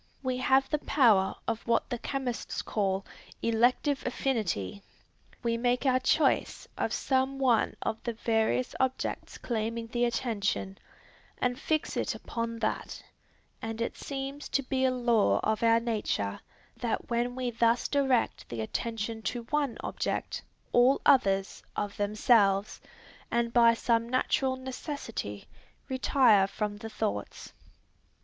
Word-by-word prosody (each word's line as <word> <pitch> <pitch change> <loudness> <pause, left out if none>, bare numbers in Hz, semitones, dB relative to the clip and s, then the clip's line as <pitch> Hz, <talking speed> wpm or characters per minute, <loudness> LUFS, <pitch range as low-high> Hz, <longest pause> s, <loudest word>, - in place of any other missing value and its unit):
We 255 -1 -1
have 265 +1 +3
the 300 - 0
power 220 -11 +3
of 230 0 -3
what 230 0 +2
the 245 - -2
chemists 260 -3 -3
call 195 -2 -1 0.4
"elective 245 +5 +2
affinity;" 205 - -2 0.6
we 230 -1 +1
make 245 +3 +1
our 255 -1 +4
choice 270 +2 +1
of - - -1
some 265 0 0
one 250 -4 +2
of 220 0 -2
the 235 - -3
various 225 +2 0
objects 260 0 -2
claiming 230 0 -2
the 240 +1 0
attention, 205 -5 -1 0.6
and 250 +1 -1
fix 310 0 -1
it - - -1
upon 230 0 -4
that; 215 -1 -3 0.6
and 225 0 -4
it 230 - -2
seems 275 +1 -5
to 275 - +1
be 260 0 0
a - - +4
law 240 -4 +2
of 220 0 0
our 230 0 +5
nature, 210 - -2 0.4
that 240 -1 -3
when 240 +1 0
we 255 -1 -2
thus 230 +1 +2
direct 270 -4 +1
the 115 -2 -4
attention 225 - -3
to 240 +2 -3
one 290 -5 0
object, - - -3 0.3
all 250 +3 +5
others, 195 -7 +3
of 205 -1 -3
themselves, 205 -1 +2 0.5
and 235 0 0
by 235 -1 +6
some 230 0 +1
natural 260 +1 +1
necessity, 260 - -6 0.4
retire 255 -6 +4
from 205 +1 -3
the 225 +1 -7
thoughts. 105 - -4
235 Hz, 135 wpm, -29 LUFS, 220-260 Hz, 0.6 s, by